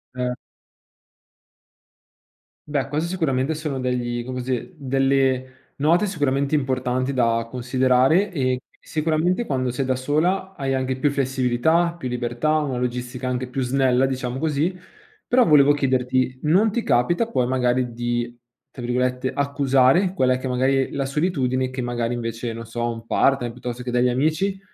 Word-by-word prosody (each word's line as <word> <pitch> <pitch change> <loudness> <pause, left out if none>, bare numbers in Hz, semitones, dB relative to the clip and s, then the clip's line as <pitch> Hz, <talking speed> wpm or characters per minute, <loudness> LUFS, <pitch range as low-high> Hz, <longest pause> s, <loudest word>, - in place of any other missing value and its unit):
Eh. 125 0 -1 2.3
Beh, 145 -2 -1
questi 155 +4 -2
sicuramente 155 -5 0
sono 150 -3 -3
degli, 120 -2 -2
come 125 0 -5
si 125 +1 -1
ehm, 155 - -7
delle 135 -1 0
note 165 +8 +3
sicuramente 145 -5 0
importanti 130 -1 0
da 115 -3 +1
considerare 130 +8 +2
e 130 -5 0 0.2
sicuramente 160 +7 0
quando 130 -2 -1
sei 130 +3 -2
da 130 -1 0
sola 175 +8 0
hai 135 -2 -2
anche 130 0 -1
più 145 +2 +1
flessibilità, 135 +5 +1
più 145 -7 -5
libertà, 125 +5 0
una 135 -4 -2
logistica 125 +1 -3
anche 125 0 -2
più 135 +1 -3
snella, 130 0 +2
diciamo 130 -1 -3
così. 160 +4 -1 0.5
Però 250 0 +4
volevo 145 -2 +6
chiederti: 130 -2 0
non 190 +8 +3
ti 235 +1 -1
capita 175 - +1
poi 125 - +1
magari 125 -1 0
di, 120 0 -2 0.4
tra 125 - -9
virgolette, 125 +1 -1
"accusare" 140 +5 +2
quella 130 -7 +2
che 130 - -4
magari 130 +2 +1
è 135 -1 +1
la 140 -1 -2
solitudine 135 -4 0
che 130 0 -5
magari 120 -1 -2
invece, 115 0 -4
non 115 0 -7
so, 120 +1 -2
un 115 0 -8
partner 125 -3 +2
piuttosto 125 0 -6
che 125 - -4
degli 125 +1 +3
amici 160 +10 0
130 Hz, 155 wpm, -22 LUFS, 125-145 Hz, 2.3 s, volevo